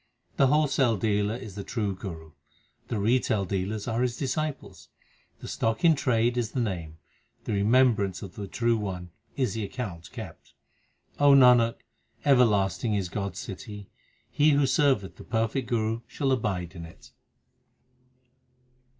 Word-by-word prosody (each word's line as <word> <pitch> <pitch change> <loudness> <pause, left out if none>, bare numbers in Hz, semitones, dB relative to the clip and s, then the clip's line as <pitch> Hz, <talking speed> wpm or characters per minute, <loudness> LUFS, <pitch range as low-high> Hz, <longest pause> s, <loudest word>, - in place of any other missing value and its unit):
The 135 - +5
wholesale 140 -5 +2
dealer 105 +1 0
is 115 -5 -8
the 100 +1 -6
true 105 -4 -2
Guru; 80 -5 -8 0.6
the 115 - -2
retail 110 -1 +1
dealers 100 +3 -3
are 115 0 0
his 125 -1 0
disciples; 150 +1 -4 0.5
The - - -7
stock 115 +6 -1
in 165 - +7
trade 120 -4 +1
is 115 -2 -3
the 130 - -1
Name; 85 -8 -3 0.5
the - - -3
remembrance 105 -3 +2
of 95 -3 -8
the 100 -2 -6
True 115 +4 +1
One 90 -4 -5 0.3
is 130 -7 0
the 110 -1 -3
account 95 -6 -6
kept. - - -10 0.6
Nanak, 125 -5 +6 0.5
everlasting 110 -5 +3
is 95 -3 -2
God 100 +1 -3
s - - -8
city; 100 +1 -9 0.4
He 150 0 +4
who 140 0 +3
serveth 130 - +1
the - - -10
perfect 115 +3 -1
Guru 115 -1 0
shall 135 -2 -1
abide 95 -9 -1
in 85 -2 -8
it. 80 - -17
110 Hz, 145 wpm, -27 LUFS, 100-125 Hz, 0.6 s, in